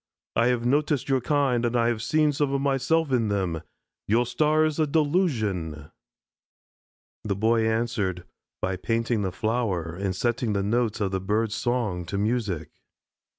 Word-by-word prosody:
"I 115 +1 +3
have 120 -1 +1
noticed 145 +1 +1
your 135 -1 +2
kind 135 -3 +1
and 120 0 0
I 120 0 +3
ever 115 - -3
see 155 +6 +2
some 145 -1 0
of - - +1
myself 140 +3 +1
in 120 -4 +2
them. 95 -6 -1 0.5
Your 115 +4 +3
star 155 +4 +2
is 155 0 -1
a 155 - +3
delusion." 110 - 0 1.3
The 100 -2 -1
Boy 110 +2 +2
answered 110 -6 -1 0.4
by 95 0 0
painting 115 +2 0
the 95 -2 -1
flower 105 -7 -1
and 95 0 -2
setting 120 +1 0
the 100 -1 0
notes 110 +1 0
of 95 -2 0
the 95 -1 -1
bird's 105 +3 0
song 110 -7 -1
to 100 - -3
music. 100 -8 -1
115 Hz, 160 wpm, -26 LUFS, 100-130 Hz, 1.3 s, I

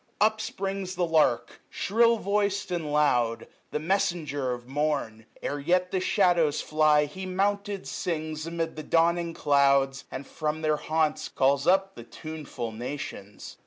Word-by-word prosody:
Up 215 +1 +3
springs 195 -2 -4
the 180 0 +1
lark, 130 -8 +1
Shrill 230 +3 +3
voic'd, 200 -2 0
and 165 -4 -2
loud, 125 -6 +2 0.2
the - - -2
messenger 155 -5 -1
of 120 0 -6
mom: 135 -6 -2 0.2
£f 145 0 -2
e - - -11
yet 180 +3 +2
the 190 - +1
shadows 170 -4 +2
fly, 155 -1 +3
he 185 +6 -7
mounted 200 +1 -1
sings 155 -2 -3
Amid 165 -1 -3
the 155 - -5
dawning 170 +2 +1
clouds, 140 -1 +3
and 135 - -6
from 155 +2 -3
their 155 -1 +2
haunts 155 0 0
590 - - -21
Calls 140 +2 +3
up 195 +1 +3
the - - -10
tuneful 150 -7 -7
nations. 110 -4 -7
155 Hz, 155 wpm, -27 LUFS, 140-185 Hz, 0.2 s, Up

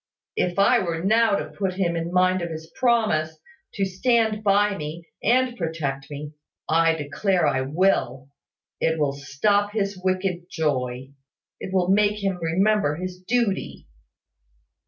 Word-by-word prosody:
If 175 -1 -1
I 200 - +5
were 170 -3 -3
now 220 +1 +3
to - - -3
put 190 -2 -3
him 175 -3 0
in 165 +1 -3
mind 185 0 +3
of 170 - -3
his 160 0 -8
promise, 210 -11 +1 0.4
to 195 - +1
stand 220 +2 +1
by 205 0 +3
me, 160 +2 -7
and 250 +2 +2
protect 150 - -3
me 145 +1 -7 0.3
I 165 0 +3
declare 160 +4 0
I 130 - +1
will 135 -3 0 0.5
it 160 0 +1
will 145 -3 0
stop 200 +9 0
his 200 -3 -2
wicked 185 -2 -1
joy 135 -5 -2 0.5
it - - -6
will 185 -1 +1
make 210 +1 +2
him 195 -2 -1
remember 185 -1 +2
his 180 +2 -6
duty." 220 0 -1
180 Hz, 145 wpm, -24 LUFS, 160-200 Hz, 0.5 s, I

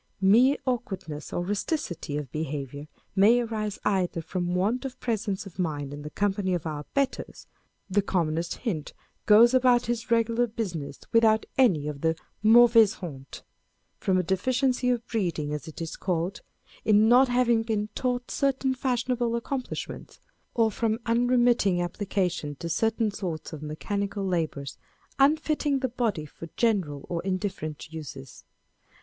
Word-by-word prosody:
Mere 235 +9 +5
awkward 240 -9 -2
ness 150 -1 -7
or 175 - -2
rusticity 195 - -2
of 145 -4 -5
behaviour 145 -2 -4 0.3
may 210 +5 +6
arise 220 -3 -3
either 185 -4 +1
from 175 +2 -2
want 215 +8 0
of 265 -2 -6
presence 210 -4 -2
of 195 -1 -12
mind 145 -5 -2
in 145 - -7
the 150 - -6
company 195 +1 0
of 170 - -4
our 150 -2 -4
betters 275 -1 -2 0.4
(the 205 +1 +2
commonest 170 -3 -1
hind 170 - -3 0.3
goes 230 +3 +7
about 250 -2 +4
his 235 0 -3
regular 230 +1 +2
business 180 - -5
without 220 -1 +4
any 185 - +3
of 145 -2 -5
the 160 0 +2 0.3
mauvaise 225 -1 +7
honte), 135 -7 -9 0.6
from 190 -1 +1
a 185 - +2
deficiency 250 +7 +1
of 240 -1 0
breeding, 170 -9 -2
as 150 +2 -5
it 160 - -9
is 165 - -5
called, 180 +1 -2 0.4
in 215 0 +5
not 250 +3 +6
having 245 -2 +3
been 220 -2 -1
taught 245 -1 -2
certain 270 -1 +1
fashion 255 -1 -1
able 240 -1 0
accomplishments 255 +2 -5
â€" - - -29 0.4
or 225 -2 +3
from 220 0 0
unremitting 240 -5 +3
application 175 -4 -2
to 170 +4 -6
certain 225 +5 +1
sorts 175 -6 -5
of 150 - -7
mechanical 200 +6 -3
labour, 165 -6 -1 0.5
unfitting 295 0 +2
the 260 -1 -1
body 225 -10 -1
for 165 +3 -11
general 185 - 0
or 170 -1 -2
indifferent 185 -5 -4
uses. 140 -5 -9
205 Hz, 150 wpm, -27 LUFS, 165-240 Hz, 0.6 s, goes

